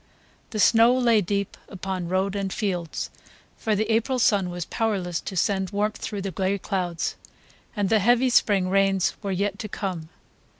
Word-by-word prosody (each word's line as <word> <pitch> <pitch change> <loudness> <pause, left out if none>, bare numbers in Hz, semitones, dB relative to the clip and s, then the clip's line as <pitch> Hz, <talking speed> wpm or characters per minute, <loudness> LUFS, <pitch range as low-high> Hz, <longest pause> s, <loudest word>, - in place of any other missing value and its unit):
The 215 - -4
snow 230 +4 +5
lay 235 -4 +4
deep 200 +1 -2
upon 190 -2 -4
road 190 +2 0
and 195 -1 -2
fields, 180 -6 -3 0.4
for 220 -2 -1
the 215 +2 +1
April 230 +4 +1
sun 205 -6 +3
was 175 -1 -4
powerless 195 -7 -1
to 190 - -6
send 190 0 +1
warmth 210 +1 -1
through 205 -3 -5
the 195 - -3
gray 190 +1 0
clouds, 180 -4 -2 0.6
and 205 -2 0
the 220 +2 +3
heavy 245 +5 +3
spring 200 -5 +3
rains 195 -1 +2
were 200 -2 -3
yet 200 +2 -1
to 215 -3 -5
come. 180 -6 -4
200 Hz, 170 wpm, -25 LUFS, 185-215 Hz, 0.6 s, snow